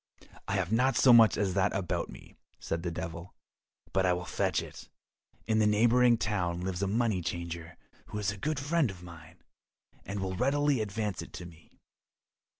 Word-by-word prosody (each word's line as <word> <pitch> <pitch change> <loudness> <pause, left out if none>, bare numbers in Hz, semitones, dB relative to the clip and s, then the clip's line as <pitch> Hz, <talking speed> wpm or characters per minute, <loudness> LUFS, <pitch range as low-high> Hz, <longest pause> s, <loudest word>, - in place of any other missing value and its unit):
"I - - -2
have 95 -1 -1
not 125 +3 +2
so 125 +3 +6
much 115 -2 +7
as 100 -3 0
that 100 +1 +2
about 95 -3 -2
me," - - -13 0.3
said 80 - -3
the 85 - -2
Devil, 85 +1 -7 0.6
"but 95 - +2
I 90 -1 +3
will 90 0 -4
fetch - - 0
it. - - -9 0.6
In 110 -1 +1
the 105 - +4
neighbouring 120 +3 +4
town 90 -6 -1
lives 95 0 -3
a 100 - +1
money 110 -2 +1
changer 85 0 -5 0.3
who - - -6
is 100 -2 0
a 105 - -8
good 150 +7 -2
friend 145 -1 +1
of 90 -2 -10
mine, 85 -3 -13 0.6
and 100 +2 -5
will 95 -1 -3
readily 140 +2 +1
advance 105 -2 -3
it - - -11
to 90 - -7
me." 85 -2 -16
100 Hz, 185 wpm, -30 LUFS, 90-115 Hz, 0.6 s, much